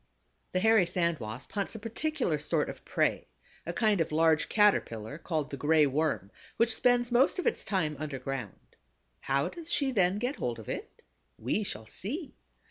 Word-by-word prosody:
The 185 - +2
Hairy 220 -2 +5
Sand 170 -3 0
Wasp 110 +4 -7
hunts 200 +1 -3
a - - -5
particular 230 - -1
sort 150 - 0
of - - -14
prey, - - 0 0.4
a - - 0
kind 215 -5 +2
of 160 - -1
large 160 0 +3
Caterpillar 145 - +2
called 155 -3 -2
the 140 - -4
Gray 150 +2 +4
Worm, 140 - 0 0.3
which 230 0 +3
spends 245 0 +2
most 255 +8 +4
of 365 - -2
its 470 - +1
time 160 -7 0
underground. 135 -6 -6 0.4
How 135 +1 0
does 335 -1 -8
she 275 -2 +2
then 190 -4 +2
get 245 +6 -2
hold 120 -2 -2
of 110 - -11
it? - - -6 0.3
We 130 - -1
shall 110 - -5
see. 275 - -5
170 Hz, 175 wpm, -30 LUFS, 140-225 Hz, 0.4 s, Hairy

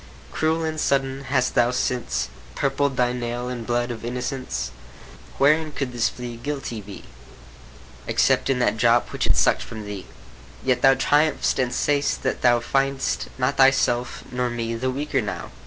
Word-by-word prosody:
Cruel 160 +1 0
and 160 -1 -2
sudden, 135 -1 0
hast 130 -1 +1
thou 120 0 +4
since 125 - -1 0.3
Purpled 140 -1 0
thy 125 0 +2
nail 120 0 -3
in 125 -2 -4
blood 120 +1 -1
of 115 - -7
innocence? 125 - -3 0.7
Wherein 155 +2 +3
could 140 -3 -3
this 120 -1 +1
flea 120 -1 -7
guilty 125 -3 -4
be, 100 0 -10 1.0
Except - - +2
in 135 - +2
that 125 -2 +1
drop 120 +1 +3
which - - -1
it - - +2
suck'd - - +3
from 110 -2 -7
thee? 100 -3 -7 0.6
Yet 125 -1 +2
thou 135 0 +6
triumph'st, 145 +2 +2
and 125 -2 +1
say'st 145 +3 0
that 130 - -1
thou 120 -1 +5
Find'st 135 +3 0
not 130 +2 0
thyself 135 -2 +3
nor 125 0 -1
me 115 -1 -3
the 125 +3 -1
weaker 135 0 -1
now. 100 -4 -5
125 Hz, 165 wpm, -23 LUFS, 120-135 Hz, 1.0 s, thou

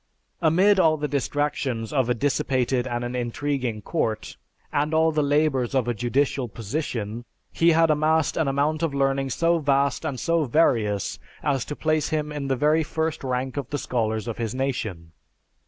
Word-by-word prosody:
Amid 185 +5 +4
all 160 -3 +4
the 150 0 -2
distractions 140 -4 -2
of 130 -4 +1
a 125 - +2
dissipated 130 -1 0
and 120 -1 -2
an 120 +1 -4
intriguing 125 -2 -2
court, 115 -9 -2 0.4
and 150 +2 +1
all 160 0 +4
the 155 -1 +1
labors 145 -3 +1
of 130 -3 +1
a 120 - +1
judicial 125 +3 0
position, 115 0 -4 0.3
he 170 0 +4
had 165 0 +4
amassed 155 +1 +2
an 160 -3 +1
amount 145 +3 0
of 160 -4 -1
learning 135 0 +1
so 165 +7 +2
vast 140 -2 +1
and 140 -5 -3
so 165 +3 +1
various 115 - +1 0.2
as 135 -4 0
to 150 - -5
place 155 0 0
him 150 -1 -1
in 145 -2 -4
the 135 - +1
very 150 +4 +3
first 160 0 -2
rank 130 +1 -2
of 140 -4 -3
the 145 - -2
scholars 110 -4 -2
of 115 - -4
his 115 0 -2
nation. 110 -11 -3
140 Hz, 175 wpm, -24 LUFS, 120-155 Hz, 0.4 s, Amid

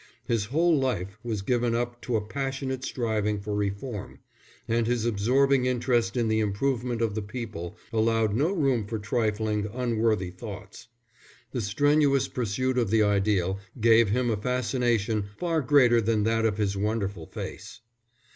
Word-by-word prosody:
His 115 -3 0
whole 160 +8 +2
life 105 -6 -2
was 110 -4 -3
given 120 +1 +1
up 120 0 -3
to 125 - -2
a 105 -1 0
passionate 135 +1 -3
striving 110 -5 -1
for 105 +1 -5
reform, 105 +2 -3 0.5
and 115 0 +1
his 120 -2 0
absorbing 125 +5 +2
interest 120 -1 +1
in 120 -2 +1
the 110 0 +2
improvement 120 +3 -1
of 110 -3 0
the 110 - -2
people 105 -5 -6 0.2
allowed 110 -1 +2
no 145 - +1
room 135 - +1
for 110 +1 -3
trifling, 105 -1 -1
unworthy 115 -6 0
thoughts. 105 +4 -9 0.6
The 125 - -2
strenuous 140 +5 +2
pursuit 125 +2 -1
of 115 -5 0
the 110 0 +4
ideal 100 -2 +1 0.2
gave 115 -1 +5
him 120 +2 +1
a 110 - 0
fascination 120 -3 0
far 165 -3 0
greater 125 -4 +5
than 110 -1 +1
that 115 +1 +2
of 105 -2 -2
his 100 -2 0
wonderful 100 -4 -2
face. 105 +3 -8
115 Hz, 155 wpm, -27 LUFS, 105-125 Hz, 0.6 s, gave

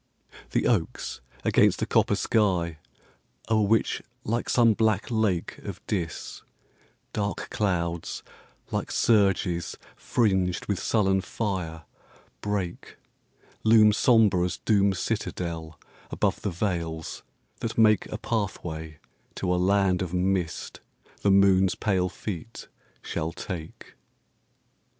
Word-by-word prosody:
The - - 0
oaks - - -1 0.2
against - - +4
a - - +2
copper - - +2
sky 90 -7 +1 0.7
o'er 110 -1 +4
which, 110 +1 +2 0.2
like 115 +2 -1
some 115 -2 +5
black 110 0 +1
lake 110 -6 0
Of - - -7
DIS, 85 -6 -4 0.7
dark 100 -1 -3
clouds, 85 -5 -1 0.5
like - - -2
surges 95 -6 +2 0.2
fringed 95 -6 +1
with 100 -3 -1
sullen 95 -3 +2
fire, 90 -6 -3 0.6
break 100 -4 -3 0.7
Loom 110 -1 +6
sombre 110 -6 +4
as 90 - -2
Doom's 100 -3 +2
citadel 85 -6 -3 0.3
above - - 0
the - - -1
vales, 85 -3 -3 0.4
that 115 - -4
make 110 -3 +4
A 110 - -5
pathway 85 -9 -3 0.4
to 90 -2 0
a - - +1
land 95 -1 +3
of 90 -1 -3
mist 90 -3 -1 0.4
the 100 - +2
moon's 95 -1 +5
pale 95 -3 +1
feet 105 +4 -7 0.4
shall 80 +1 -3
take. 85 -3 -7
95 Hz, 110 wpm, -26 LUFS, 85-105 Hz, 0.7 s, Loom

